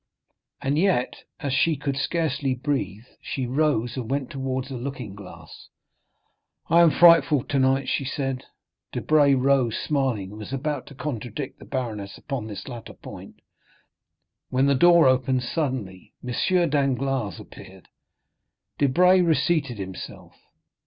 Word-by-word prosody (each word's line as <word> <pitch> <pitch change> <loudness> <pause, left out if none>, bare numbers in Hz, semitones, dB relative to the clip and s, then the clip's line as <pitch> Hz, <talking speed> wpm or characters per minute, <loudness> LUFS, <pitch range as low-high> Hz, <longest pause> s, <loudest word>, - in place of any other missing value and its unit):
And 140 +3 +1
yet, 180 -9 0 0.2
as 140 -4 -2
she 160 +4 +3
could 140 -1 -3
scarcely 140 -3 -1
breathe, 125 -5 -3 0.2
she 130 - -3
rose 125 -3 0
and 120 -4 -4
went 135 -1 -2
towards 130 0 -3
a - - -4
looking 125 -4 -6
glass. 100 -2 -12 1.0
"I 170 +1 +7
am 170 - +7
frightful 165 -4 +5
tonight," 135 -1 +1
she - - 0
said. 135 -1 -3 0.5
Debray 145 -3 +3
rose, 130 -3 +2
smiling, 130 -10 -1
and 105 - -10
was 105 - -8
about 140 0 -3
to 140 - -12
contradict 130 -1 -5
the - - -12
baroness 110 -7 -4
upon 130 -6 -5
this 105 -2 -8
latter 120 -3 -8
point, - - -12 1.1
when 130 +1 +2
the 140 - +4
door 170 +4 +6
opened 130 0 +2
suddenly. 125 - -4
M. - - -3 0.4
Danglars 135 - 0
appeared; - - -13 0.9
Debray 180 +7 +5
reseated 160 -6 +1
himself. 95 -2 -8
135 Hz, 130 wpm, -24 LUFS, 125-145 Hz, 1.1 s, I